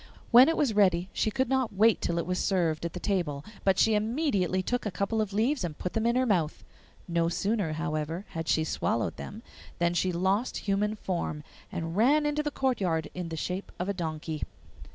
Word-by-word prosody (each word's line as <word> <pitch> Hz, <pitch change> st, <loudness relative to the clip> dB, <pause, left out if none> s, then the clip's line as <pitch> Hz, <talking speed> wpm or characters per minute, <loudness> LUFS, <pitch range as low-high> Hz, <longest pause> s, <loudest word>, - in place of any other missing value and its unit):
When 250 Hz, +5 st, +9 dB
it 325 Hz, -, 0 dB
was 275 Hz, -7 st, +2 dB
ready 185 Hz, -3 st, +3 dB
she -, -, +1 dB
could 260 Hz, +4 st, 0 dB
not 260 Hz, -4 st, 0 dB
wait 220 Hz, +2 st, +4 dB
till 170 Hz, -, -1 dB
it 170 Hz, -, -1 dB
was 180 Hz, +1 st, -1 dB
served 170 Hz, -5 st, +1 dB
at 170 Hz, -, -3 dB
the 180 Hz, -, -5 dB
table, 165 Hz, -8 st, -1 dB, 0.2 s
but 190 Hz, -1 st, +3 dB
she 225 Hz, -, +4 dB
immediately 210 Hz, -, +1 dB
took 245 Hz, +5 st, -1 dB
a 210 Hz, -, -1 dB
couple 205 Hz, +3 st, -1 dB
of 210 Hz, -2 st, -2 dB
leaves 230 Hz, +6 st, +1 dB
and 165 Hz, -4 st, -4 dB
put 180 Hz, -, -4 dB
them 225 Hz, +1 st, +1 dB
in 235 Hz, -, +2 dB
her 255 Hz, 0 st, +3 dB
mouth. 175 Hz, -9 st, 0 dB, 0.4 s
No 170 Hz, -1 st, +1 dB
sooner, 200 Hz, -2 st, 0 dB
however, 160 Hz, +2 st, -3 dB
had 165 Hz, -2 st, -5 dB
she 160 Hz, -, +2 dB
swallowed 115 Hz, -6 st, -1 dB
them 220 Hz, +3 st, -8 dB, 0.3 s
than 170 Hz, 0 st, +1 dB
she 185 Hz, +1 st, +1 dB
lost 190 Hz, +7 st, 0 dB
human 210 Hz, +1 st, +1 dB
form, 170 Hz, -7 st, -3 dB, 0.3 s
and 165 Hz, 0 st, -4 dB
ran 280 Hz, +8 st, +4 dB
into 295 Hz, 0 st, +1 dB
the 300 Hz, -, -1 dB
courtyard 190 Hz, -, 0 dB
in 180 Hz, -2 st, -5 dB
the 160 Hz, -, -5 dB
shape 185 Hz, +4 st, -4 dB
of 180 Hz, -, -3 dB
a -, -, +1 dB
donkey. 160 Hz, -3 st, -4 dB
190 Hz, 210 wpm, -28 LUFS, 170-225 Hz, 0.4 s, When